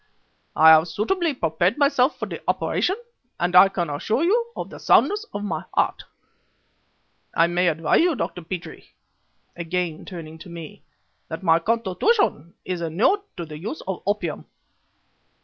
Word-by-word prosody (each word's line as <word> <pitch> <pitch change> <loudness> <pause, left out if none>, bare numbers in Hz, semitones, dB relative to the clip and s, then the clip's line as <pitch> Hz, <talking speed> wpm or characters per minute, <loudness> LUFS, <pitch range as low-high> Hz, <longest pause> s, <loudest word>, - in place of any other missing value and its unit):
I 160 +1 +8
have 160 +1 +6
suitably 305 - -1
prepared 170 - 0
myself 280 -1 +2
for - - -3
the - - -7
operation, 375 - 0 0.4
and 175 +1 0
I 190 +2 +9
can 180 -3 -2
assure 215 - -1
you 465 +6 +1
of - - -6
the - - -10
soundness 420 +2 +3
of 205 - -5
my 165 -6 -3
heart. - - 0 1.3
I 165 - +5
may 175 +1 +1
advise 160 -2 +2
you, 345 -2 +2
Dr. 180 - -4
Petrie" 175 +1 -8 0.6
again 170 -1 -3
turning 160 -3 -9
to 175 - -11
me 165 -3 -9 0.5
"that 160 +3 -7
my 165 -2 +4
constitution 225 - 0
is 180 -2 -3
inured 175 - +2 0.2
to 170 - -4
the 150 -1 -9
use 220 - -6
of 190 -2 -3
opium. 195 -6 -2
180 Hz, 150 wpm, -23 LUFS, 165-245 Hz, 1.3 s, I